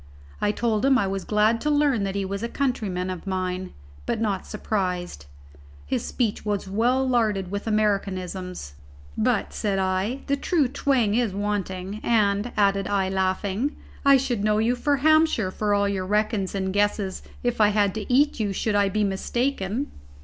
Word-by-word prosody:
I 205 - +2
told 220 -1 0
him 270 -1 +5
I 200 - +1
was 195 0 -3
glad 215 +2 +2
to 300 - 0
learn 290 -8 +2
that 195 0 -3
he 200 -1 -1
was 200 +1 -4
a 235 - -3
countryman 210 -10 -1
of 185 +2 -7
mine, 185 -1 -2 0.4
but - - -1
not 205 -4 -1
surprised. 180 - -3 0.6
His - - -1
speech 230 -5 -1
was 205 -2 -2
well 245 +7 +1
larded 215 -7 +1
with 200 +2 -4
americanisms, 190 - -1 0.4
"but," 230 -1 0
said 205 -3 -1
I, 190 +7 -1
"the 280 - +1
true 295 0 +1
twang 250 -5 +1
is 230 -3 +1
wanting, 200 -1 -3
and," 210 0 +1
added 195 -2 +2
I, 195 -2 +1
laughing, 190 +7 -1 0.3
"I 275 -1 +7
should 245 -5 -1
know 210 0 +2
you 230 +3 +2
for 285 +3 +1
Hampshire 310 -9 +3
for 210 +2 -1
all 200 0 +2
your 190 -2 -2
reckons 210 -1 0
and 190 -1 -1
guesses 205 -1 0 0.2
if 245 -2 0
I 210 - +7
had 205 -2 +2
to 220 +2 -5
eat 285 +2 +3
you 205 -2 0
should 215 +3 -1
I 205 -1 +3
be 210 +2 0
mistaken." 225 +4 -1
205 Hz, 175 wpm, -25 LUFS, 195-240 Hz, 0.6 s, I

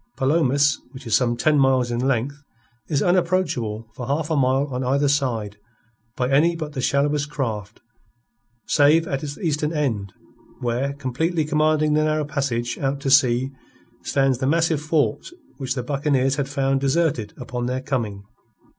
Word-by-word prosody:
Palomas, 145 0 +2
which 130 - -11
is 115 - +2
some 120 -2 +1
ten 150 +3 +3
miles 130 -2 +3
in 120 - -1
length, 135 +2 -1 0.5
is 145 -3 0
unapproachable 170 - 0
for 120 +1 -7
half 150 +3 -1
a - - +2
mile 135 0 +2
on 125 +1 -2
either 140 +3 +2
side 120 -8 -1 0.6
by 125 - 0
any 150 +6 +3
but 155 -2 -5
the 130 - -3
shallowest 145 +2 +1
craft 115 -8 -4 0.8
save 160 +2 +4
at 135 -2 -2
its 145 -1 -6
eastern 150 -3 -1
end, 115 - -1 0.5
where, 125 +3 -1
completely 150 +5 -1
commanding 155 0 +2
the 155 0 +3
narrow 155 0 0
passage 135 -5 -2
out 140 0 -1
to 135 -1 -1
sea, 130 -1 +4 0.5
stands 135 -3 +1
the 130 - 0
massive 160 0 +2
fort 150 -1 0 0.3
which 130 -2 -3
the 125 - -3
buccaneers 135 0 0
had 140 -1 -2
found 135 -1 0
deserted 135 -6 0
upon 120 -1 -4
their 130 +1 -2
coming. 110 -7 -3
140 Hz, 160 wpm, -22 LUFS, 125-150 Hz, 0.8 s, save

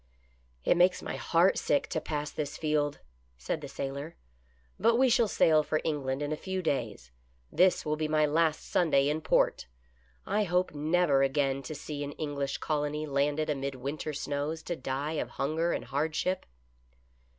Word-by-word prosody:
" 60 0 -36
It - - +4
makes 180 +1 +4
my - - -4
heart 175 +3 +3
turn - - -3
sick 145 - +2
to 160 - -2
pass 150 -1 -3
this 150 0 -4
field," 150 -2 0 0.4
said 155 - -3
the 145 - -6
sailor. 140 +3 -5 0.3
" 60 0 -36
But 230 +3 +4
we 260 +2 +4
shall 230 -1 +4
sail 155 -5 +4
for 155 +1 -1
England 140 -3 -1
in 145 - -3
a - - +1
few 190 +3 -4
days; 115 - -2 0.4
this 185 0 +3
will 150 0 0
be 155 0 -1
my 155 0 +3
last 155 +1 +1
Sunday 145 -5 +3
in 155 +2 -1
port. 155 - +2 0.6
I 210 0 +1
hope 180 -1 +1
never 150 -1 +2
again 135 0 +1
to 150 +3 -7
see 145 0 -5
an 145 0 -5
English 145 -2 -3
colony 150 0 -1
landed 145 +2 0
amid 140 -2 -2
winter 140 +4 -4
snows 150 +2 -3
to 175 - -3
die 140 +3 -3
of 120 - -5
hunger 155 +5 0
and - - -2
hardship." 160 +6 -1
150 Hz, 180 wpm, -30 LUFS, 140-160 Hz, 0.6 s, It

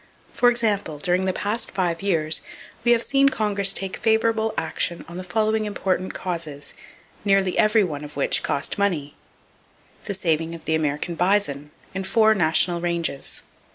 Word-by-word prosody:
For 245 - +4
example, 210 -9 0
during 180 +5 0
the 190 - +2
past 210 +5 -2
five 180 -3 -1
years 160 -6 +2 0.4
we 240 - +4
have 235 -1 +4
seen 275 0 +4
Congress 205 -5 +1
take 195 -1 -1
favorable 220 0 +2
action 170 - -2
on 170 +1 -8
the 185 - -5
following 215 +4 0
important 185 -3 -2
causes, 160 -6 -4 0.5
nearly 195 -2 +2
every 215 0 +4
one 150 -5 -4
of 150 0 -10
which 140 - +2
cost 140 +7 -2
money: 165 -8 0 0.9
The 200 - -2
saving 165 -2 -1
of 165 - -12
the 160 - 0
American 155 +2 -1
bison, 170 -5 0 0.2
in 190 0 -3
four 220 +3 +4
National 175 -1 +2
ranges. 170 -5 -2
185 Hz, 155 wpm, -23 LUFS, 165-215 Hz, 0.9 s, For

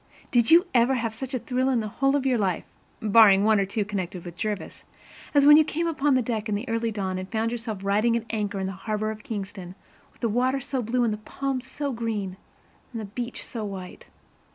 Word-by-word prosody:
Did 235 -3 +3
you 340 +3 +7
ever 245 +2 +4
have 230 -3 -2
such 260 +3 -5
a - - +2
thrill 255 +1 -1
in 255 -3 +2
the 215 - -2
whole 275 +6 +1
of 275 -2 0
your 255 -3 +2
life, 190 -4 0 0.4
barring 205 -2 +6
one 215 -1 +4
or 195 - +1
two 205 +1 -1
connected 185 -3 -4
with 175 -1 -8
Jervis, 210 +1 -4 0.5
as 285 -1 +6
when 295 +1 +9
you 315 - +7
came 325 +2 -2
up 325 -4 -3
on 285 -1 +4
deck 220 -2 -3
in 210 - +1
the 215 +6 -4
early 230 0 0
dawn 190 -3 -3
and 185 +1 -7
found 225 0 0
yourself 225 -4 -5
riding 215 +4 +2
at 230 - -5
anchor 205 -3 -2
in 190 - -2
the 190 - -3
harbor 215 +3 -2
of 215 0 -8
Kingston, 195 -4 -6 0.4
with - - -28
the 235 - +2
water 255 +5 +1
so 265 0 -3
blue 240 +2 0
and 225 -2 +1
the - - -4
palms 265 +4 -4
so 285 0 -3
green 215 -6 -3 0.5
and 230 - -5
the 215 - -5
beach 240 +4 -5
so 230 -4 -5
white? 190 -3 -7
225 Hz, 235 wpm, -26 LUFS, 205-255 Hz, 0.5 s, when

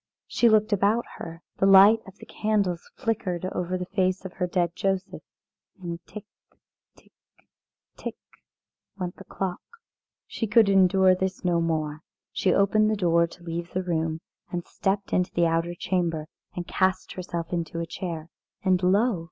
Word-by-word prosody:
She 235 - +3
looked 215 0 +3
about 205 +4 +2
her. 165 +1 -8
The 195 - +3
light 195 +3 +8
of 195 - -12
the - - -12
candles 200 -5 -1
flickered 195 -7 -2
over 180 +1 -2
the 180 - -4
face 185 0 0
of 190 - -6
her 180 - -1
dead 175 -1 0
Joseph. 195 0 -2 0.6
And 170 -2 -6
tick, 210 -1 -9 0.7
tick, - - -24 0.9
tick - - -5 0.8
went 180 -2 -4
the - - -10
clock. 185 -2 -4 0.6
She 225 - -3
could 220 -1 +5
endure 190 -1 +5
this 190 +1 -3
no 175 -1 +3
more. 155 -2 -1 0.3
She 185 - +1
opened 215 +3 +3
the 215 - +1
door 170 -3 +3
to 175 +1 -15
leave 170 0 -5
the 185 - -1
room, 160 -2 -1 0.3
and 175 -1 -3
stepped 195 +1 -2
into 180 -1 +1
the 170 - +3
outer 165 +1 0
chamber 170 -4 -1 0.3
and 175 - -4
cast 185 0 0
herself 175 -2 -5
into 170 -1 -2
a 170 - -2
chair. 165 -1 -6 0.3
And 185 -2 +3
lo! 200 +3 +3
185 Hz, 160 wpm, -26 LUFS, 170-195 Hz, 0.9 s, light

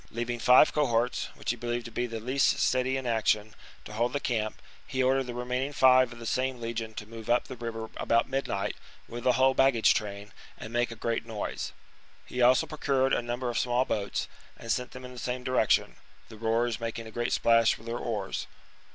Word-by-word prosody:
Leaving 120 +1 -3
five 125 +5 +6
cohorts, 125 -4 +1
which - - -2
he - - -3
believed 120 0 -3
to 115 - -8
be 120 +2 -1
the 115 -1 -5
least 130 +5 +2
steady 130 +1 +1
in 130 - -5
action, 110 -2 +1 0.3
to 105 - -9
hold 120 +3 0
the 145 - 0
camp, 110 -5 -2 0.3
he 130 0 0
ordered 135 +1 +2
the 125 - -6
remain 125 +1 -2
ing 140 +2 -3
five 130 -2 +5
of 120 - -10
the 115 - -9
same 130 +2 -1
legion 115 -1 -4
to 105 - -6
move 115 +1 -10
up 120 +1 +3
the - - -7
river 115 -2 -5
about 115 +1 +2
midnight 130 -7 -2 0.3
with 120 0 -7
the 130 -1 +4
whole 130 +2 +4
baggage 135 -4 +4
train, 100 -1 -4 0.3
and 110 - -9
make 120 0 +1
a 115 - -7
great 115 +1 -2
noise. 110 -2 -4 0.5
He 125 - -4
also 125 +1 +5
procured 135 -3 0
a - - +2
number 120 +1 -3
of 115 - -1
small 125 +1 +1
boats, 100 -5 -2 0.3
and 115 - -4
sent 125 +2 -1
them 130 0 -10
in 125 - -9
the 125 - -9
same 125 +1 -4
direc 130 0 +1
tion, - - +2 0.3
the 110 - -11
rowers 115 +1 0
making 115 0 -4
a 110 - -9
great 120 +1 -2
splash 115 -1 +4
with 110 - -16
their 115 +1 -3
oars. 105 -5 -3
120 Hz, 220 wpm, -28 LUFS, 115-125 Hz, 0.5 s, five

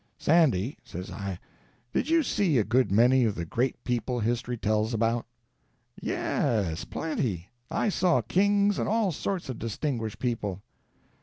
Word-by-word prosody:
"Sandy," 145 - +2
says 90 +2 -7
I, 100 -3 -4 0.6
"did 290 - 0
you 330 -1 +4
see 185 - +1
a 110 - +4
good 120 +2 +2
many 125 +5 +5
of 110 -3 +1
the 85 - -3
great 125 +10 -1
people 125 0 -1
history 120 +2 -1
tells 110 +1 0
about?" 115 +1 0 0.7
"Yes—plenty. 105 - -1 0.2
I - - 0
saw 180 -3 +2
kings 200 +1 +2
and - - 0
all 220 -3 +2
sorts 180 +4 -3
of 130 -3 -5
distinguished 115 -1 -3
people." 105 -6 -2
120 Hz, 140 wpm, -28 LUFS, 105-160 Hz, 0.7 s, many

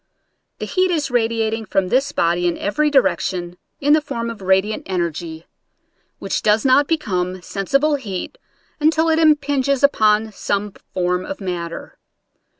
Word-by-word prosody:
The - - -4
heat 370 0 +1
is 305 -6 -1
radiating 225 -2 0
from 195 -3 0
this 270 +5 +1
body 175 -5 +1
in 170 - -1
every 295 +10 0
direction 180 -10 0 0.2
in 290 +1 +3
the 310 - +4
form 235 -5 -4
of 225 - -10
radiant 190 +3 +1
energy, 170 -3 -3 0.7
which - - -3
does 215 +2 +2
not 275 +2 +4
become 185 - -2
sensi 195 +9 0
ble 300 +1 +1
heat 215 - -6 0.4
until 315 +2 +2
it 320 0 +2
impinges 285 -3 +2
upon 215 -5 +3
some 205 0 -2 0.2
form 180 0 0
of 290 - -6
matter. 175 -3 -6
220 Hz, 150 wpm, -20 LUFS, 185-285 Hz, 0.7 s, the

